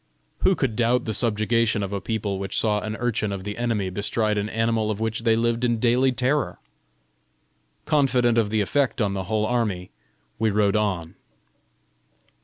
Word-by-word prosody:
Who 190 Hz, -, +3 dB
could 135 Hz, -8 st, -1 dB
doubt 120 Hz, +1 st, +2 dB
the 110 Hz, -, -2 dB
subjugation 110 Hz, -1 st, +1 dB
of 100 Hz, +1 st, -4 dB
a 100 Hz, -, -2 dB
people 105 Hz, -3 st, -2 dB
which 95 Hz, 0 st, -3 dB
saw 105 Hz, -2 st, +2 dB
an 110 Hz, 0 st, -4 dB
urchin 115 Hz, -3 st, -1 dB
of 100 Hz, -1 st, -5 dB
the 105 Hz, +1 st, -5 dB
enemy 115 Hz, -6 st, -1 dB
bestride 105 Hz, +2 st, 0 dB
an 105 Hz, +1 st, -2 dB
animal 115 Hz, -1 st, 0 dB
of 105 Hz, -1 st, -2 dB
which 110 Hz, 0 st, -1 dB
they 115 Hz, -1 st, +2 dB
lived 115 Hz, +1 st, 0 dB
in 120 Hz, -1 st, +2 dB
daily 125 Hz, +3 st, +3 dB
terror? 130 Hz, +2 st, 0 dB, 1.3 s
Confident 125 Hz, -6 st, +3 dB
of 110 Hz, -3 st, +1 dB
the 110 Hz, 0 st, +1 dB
effect 130 Hz, +4 st, 0 dB
on 100 Hz, -3 st, +1 dB
the 95 Hz, -1 st, -3 dB
whole 110 Hz, 0 st, 0 dB
army, 110 Hz, -6 st, -1 dB, 0.5 s
we 110 Hz, 0 st, +2 dB
rode 105 Hz, -1 st, +2 dB
on. 95 Hz, -6 st, -1 dB
110 Hz, 175 wpm, -24 LUFS, 105-120 Hz, 1.3 s, Who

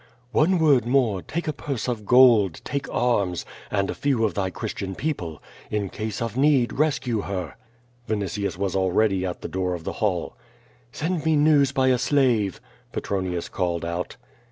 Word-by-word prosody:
"One 170 Hz, +8 st, +3 dB
word 145 Hz, -7 st, +4 dB
more, 120 Hz, -7 st, +2 dB
take 170 Hz, -, -4 dB
a 155 Hz, -, 0 dB
purse 135 Hz, -3 st, -4 dB
of 110 Hz, -5 st, -3 dB
gold, 120 Hz, -8 st, +6 dB
take 140 Hz, -1 st, -3 dB
arms, 100 Hz, -8 st, 0 dB, 0.2 s
and 100 Hz, -1 st, 0 dB
a -, -, -2 dB
few 130 Hz, -6 st, +1 dB
of 105 Hz, -, -1 dB
tliy 95 Hz, -1 st, -1 dB
Christian 100 Hz, -3 st, -5 dB
people. 90 Hz, -, -4 dB, 0.3 s
In 105 Hz, -3 st, -2 dB
ease 110 Hz, +1 st, -2 dB
of 115 Hz, -1 st, -4 dB
need 135 Hz, -3 st, +3 dB
rescue 130 Hz, -7 st, 0 dB
lier!" 90 Hz, -7 st, -4 dB, 0.5 s
Vinitius 100 Hz, -3 st, -2 dB
was 95 Hz, -1 st, -1 dB
already 95 Hz, 0 st, +2 dB
at 90 Hz, -, -5 dB
the -, -, -4 dB
door 90 Hz, -1 st, -1 dB
of 85 Hz, -, -8 dB
the -, -, -4 dB
hall. -, -, 0 dB, 0.6 s
"Send 165 Hz, +4 st, -2 dB
me 160 Hz, -1 st, +3 dB
news 145 Hz, -2 st, +4 dB
by 130 Hz, -1 st, +2 dB
a 125 Hz, -1 st, +3 dB
slave," 120 Hz, -10 st, +2 dB, 0.3 s
Petronius 90 Hz, -3 st, -2 dB
called 85 Hz, -3 st, -2 dB
out. 85 Hz, +1 st, -4 dB
110 Hz, 170 wpm, -24 LUFS, 95-135 Hz, 0.6 s, gold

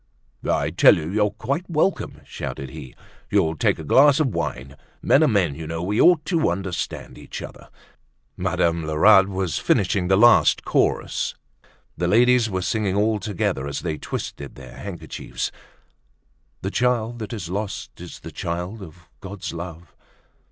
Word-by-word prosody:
"I -, -, +1 dB
tell -, -, +6 dB
you, 80 Hz, +1 st, -4 dB
you're 105 Hz, +1 st, +2 dB
quite 140 Hz, -, -4 dB
welcome!" 165 Hz, +3 st, 0 dB
shouted 65 Hz, -1 st, -6 dB
he. 70 Hz, -5 st, -10 dB, 0.3 s
"You'll 85 Hz, -6 st, +2 dB
take -, -, +1 dB
a 80 Hz, -, -7 dB
glass 140 Hz, -, +5 dB
of 140 Hz, -7 st, +1 dB
wine. 65 Hz, +2 st, -4 dB, 0.3 s
Men 140 Hz, -, +4 dB
are -, -, +5 dB
men, 100 Hz, -, +2 dB
you 80 Hz, +2 st, -7 dB
know. 80 Hz, +1 st, -4 dB
We 105 Hz, +4 st, +1 dB
ought 170 Hz, -4 st, +5 dB
to 165 Hz, -, +1 dB
understand 90 Hz, +1 st, -4 dB
each -, -, -8 dB
other." -, -, -11 dB, 0.7 s
Madame 85 Hz, -1 st, 0 dB
Lerat 95 Hz, +6 st, +5 dB
was 95 Hz, -4 st, -2 dB
finishing 95 Hz, -1 st, +1 dB
the 95 Hz, +1 st, +4 dB
last 120 Hz, +2 st, +5 dB
chorus. -, -, 0 dB, 0.6 s
The 85 Hz, -, 0 dB
ladies 120 Hz, +3 st, +4 dB
were 95 Hz, -2 st, -2 dB
singing 100 Hz, -1 st, 0 dB
all 105 Hz, +1 st, +2 dB
together 85 Hz, -10 st, -2 dB
as 70 Hz, -, -4 dB
they 75 Hz, -1 st, -3 dB
twisted 70 Hz, -1 st, -6 dB
their 65 Hz, -2 st, -12 dB
handkerchiefs. -, -, -5 dB, 1.1 s
"The -, -, -2 dB
child 120 Hz, -1 st, 0 dB
that 110 Hz, -, -6 dB
is 95 Hz, -7 st, -5 dB
lost 100 Hz, 0 st, -5 dB
is -, -, -10 dB
the -, -, -9 dB
child 90 Hz, +6 st, -4 dB
of 90 Hz, 0 st, -12 dB
God's 95 Hz, -3 st, -7 dB
love." 85 Hz, -1 st, -8 dB
95 Hz, 160 wpm, -23 LUFS, 85-110 Hz, 1.1 s, tell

